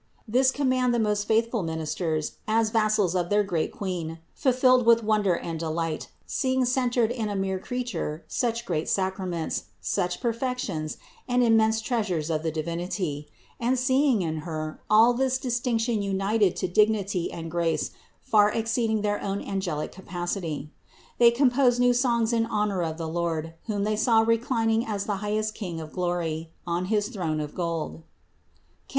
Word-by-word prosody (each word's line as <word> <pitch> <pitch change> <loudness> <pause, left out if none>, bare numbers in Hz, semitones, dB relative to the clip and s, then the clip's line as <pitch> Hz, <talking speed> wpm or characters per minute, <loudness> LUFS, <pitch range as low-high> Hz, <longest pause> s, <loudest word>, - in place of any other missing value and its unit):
This 255 +4 +4
command 255 -3 +1
the - - +1
most 210 -1 0
faithful 230 0 +2
ministers, 160 -1 -2
as 220 0 +2
vassals 215 -5 +2
of 175 -2 0
their 205 0 +3
great 175 -5 -1
Queen, 175 -5 -4 0.2
fulfilled 255 -1 +4
with 230 0 +5
wonder 210 -4 +2
and 165 -1 -4
delight, 165 -1 -2 0.2
seeing 260 -1 0
centered 245 -2 +1
in 230 -4 -2
a 205 - -3
mere 190 -1 -1
Creature 215 -10 -4
such 235 -1 -1
great 165 -6 -1
sacraments, 185 -3 -1
such 95 - -1
perfections, 230 - -2 0.3
and 250 0 +3
immense 220 -1 +4
treasures 200 -9 -1
of 155 -1 0
the 160 - -1
Divinity, 165 -1 -3 0.3
and 245 +2 +1
seeing 260 -3 +3
in 160 -1 -2
Her 155 -1 -5
all 225 +3 +6
this 260 +1 +1
distinction 240 -3 0
united 200 0 +1
to 185 - -1
dignity 200 -1 +1
and 165 -1 -6
grace 165 -2 0 0.3
far 210 -1 +4
exceeding 225 -1 0
their 205 0 0
own 200 0 -2
angelic 185 -8 -3
capacity. 175 -5 -4 0.5
They 235 -1 +8
composed 245 0 +3
new 245 0 +5
songs 240 -2 +2
in 225 -1 +2
honor 210 -4 0
of 160 -1 -2
the 165 -1 -4
Lord, 165 -1 -2
whom 205 -2 -1
they 215 +1 +1
saw 225 +1 +4
reclining 225 0 +1
as 205 -3 -3
the 205 -2 -1
highest 215 +2 -1
King 180 -7 -5
of 155 -1 -8
glory, 170 -3 -2 0.2
on 175 +1 -1
his 210 +1 0
throne 170 -9 -2
of 150 -1 -4
gold 165 - -3 0.8
(Cant. - - -39
205 Hz, 160 wpm, -26 LUFS, 170-235 Hz, 0.8 s, They